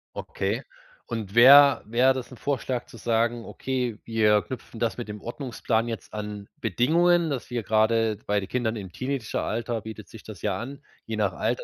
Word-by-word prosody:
Okay - - -3 0.4
und 110 -2 -5
wär 140 +4 +8
wäre 125 +4 +3
das 130 -1 -6
ein 125 - -11
Vorschlag 130 -3 -2
zu 115 - -14
sagen:„ 115 +1 0
Okay, 125 -4 -3
wir 105 -2 +3
knüpfen 125 -2 -8
das 115 +1 -1
mit 120 - -5
dem 105 -1 -7
Ordnungsplan 120 -2 -2
jetzt 115 -5 -6
an 105 -1 -6
Bedingungen. 165 - +3
Das 135 -4 -4
wir 120 -2 -2
grade", 110 0 +2
bei 105 0 +2
den 95 - -6
Kindern 120 -3 -1
im 95 -4 -7
Teenageralter 120 -3 -3
bietet 110 0 -9
sich 110 - -12
das 105 -5 -10
ja 100 -3 -1
an, 135 +4 -7 0.3
je 110 - -4
nach 100 -3 +1
Alter. 85 - -1
115 Hz, 180 wpm, -26 LUFS, 110-125 Hz, 0.4 s, wär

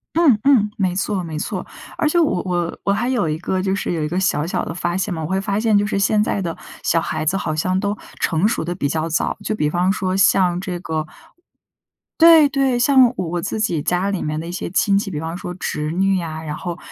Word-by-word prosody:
嗯 315 -10 +5
嗯。 235 -7 +4
没 185 -3 0
错 195 0 -1
没 160 -2 -5
错。 - - -4 0.3
而 305 - +1
且 345 - +1
我 295 - +2
我 175 -2 -2
我 200 - +2
还 235 +5 -1
有 245 -10 +1
一 155 0 -2
个 185 +2 -2
就 190 0 0
是 200 - -2
有 165 - -2
一 150 - -1
个 180 +3 -2
小 175 -5 +1
小 - - -2
的 - - -5
发 175 0 -2
现 190 0 -1
嘛， 160 -2 -4
我 - - -2
会 190 +1 0
发 200 +1 -1
现 220 -2 +3
就 205 0 +2
是 200 - -1
现 210 +1 +2
在 205 - -1
的 170 -3 -3 0.3
小 165 - +2
孩 155 - -3
子 180 +5 +1
好 155 -5 -2
像 185 +4 0
都 205 +1 -1 0.2
成 165 +4 +1
熟 225 - -1
得 175 +2 -3
比 145 -6 -1
较 160 +3 -1
早。 165 - -1
就 215 - -1
比 150 -8 0
方 180 +4 +1
说 190 -2 -1
像 180 -2 +3
这 185 -2 -4
个 160 -2 -3 1.1
对 325 -3 +8
对。 270 -3 +1
像 260 0 +6
我 180 - -2
我 175 +1 -2
自 215 +3 -3
己 170 -8 0
家 180 +5 0
里 195 - -2
面 155 0 -2
的 165 - -6
一 - - -5
些 180 - -4
亲 195 +2 +2
戚， 200 -1 -2
比 150 - -3
方 165 +2 -4
说 180 - -6
侄 150 -4 -3
女 190 +1 +1
啊， 160 -1 -5
然 150 -1 -4
后 175 0 -5
185 Hz, 275 characters per minute, -20 LUFS, 165-205 Hz, 1.1 s, 对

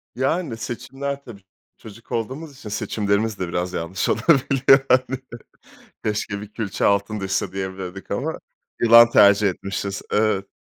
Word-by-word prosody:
Yani, 135 0 -1
seçimler 135 +4 -5
tabii. 110 -6 -12 0.4
Çocuk 115 +1 -14
olduğumuz 135 +6 -4
için 120 -6 -9
seçimlerimiz 105 0 -1
de 90 - -2
biraz 90 +1 -3
yanlış 85 +3 -2
olabiliyor 135 -3 +4
hani. 130 0 +2 0.8
"Keşke 105 -1 -2
bir 105 0 -11
külçe 110 -4 -2
altın 100 +1 +1
düşse." 95 -1 -2
diyebilirdik 95 0 -6
ama - - -2 0.4
yılan 115 0 +8
tercih 100 -1 +6
etmişiz. 100 +1 -4
Evet. 105 -2 +1
110 Hz, 130 wpm, -22 LUFS, 100-125 Hz, 0.8 s, yılan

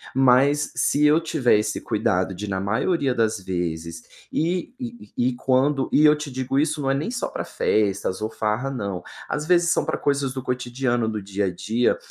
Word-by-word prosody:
mas 135 +3 +4
se 150 +1 +2
eu 150 +2 +5
tiver 155 -9 +2
esse 105 0 -2
cuidado 95 -3 0
de 100 +3 -6
na 95 -1 -2
maioria 130 - 0
das 110 -3 0
vezes 85 -3 -4 0.3
e 175 +8 -1
e 240 -2 -8
e 125 +1 +2
e 120 - -7
quando 130 +2 +1
e 150 - +5
eu 150 0 +7
te 150 -1 -6
digo 130 +1 -2
isso 150 +1 +1
não 135 - 0
é - - +3
nem 145 +11 -2
só 245 - -2
para - - -5
festas 100 -2 0
ou 110 - -1
farra 110 +5 -2
não, 100 -8 -4 0.3
às 150 - -2
vezes 175 0 +3
são - - +2
para - - -1
coisas 140 -2 0
do 130 - -4
cotidiano, 125 -2 -1
do 110 -1 -3
dia 100 +1 -2
a 90 - -3
dia, 110 +7 +1
125 Hz, 205 wpm, -23 LUFS, 105-145 Hz, 0.3 s, eu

